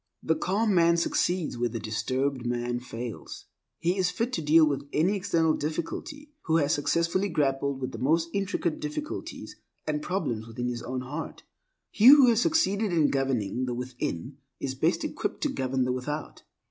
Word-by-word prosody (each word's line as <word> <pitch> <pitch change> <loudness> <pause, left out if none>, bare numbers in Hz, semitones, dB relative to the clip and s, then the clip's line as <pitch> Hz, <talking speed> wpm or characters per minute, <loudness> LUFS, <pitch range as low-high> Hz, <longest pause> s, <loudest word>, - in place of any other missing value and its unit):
The 160 - +2
calm 205 +6 0
man 170 -1 +4
succeeds 170 -4 0
where 120 0 +1
the 115 0 -4
disturbed 130 +5 -1
man 120 0 -1
fails. 120 -2 -7 0.3
He 180 +3 0
is 180 -1 +2
fit 230 +7 -2
to 165 - -1
deal 155 +1 +6
with 140 -1 -2
any 175 +7 +2
external 170 -5 +2
difficulty, 170 - -4
who 160 -1 +3
has 145 -2 +2
successfully 170 +6 +1
grappled 140 -3 0
with 130 - -4
the - - -7
most 165 +5 +2
intricate 195 -5 -1
difficulties 150 - -6 0.3
and 150 -1 -1
problems 145 - -2
within 120 +2 -3
his 120 -1 -4
own 125 +1 -4
heart. 145 +6 -6 0.5
He 215 - +4
who 275 -2 +9
has 230 -1 +3
succeeded 220 - +2
in 160 -4 +3
governing 130 -4 0
the 125 -1 -3
within 125 - -4 0.2
is 135 - -3
best 130 - +1
equipped - - -3
to - - +1
govern 130 0 -1
the 125 - 0
without. 145 +4 -4
150 Hz, 170 wpm, -27 LUFS, 130-180 Hz, 0.5 s, who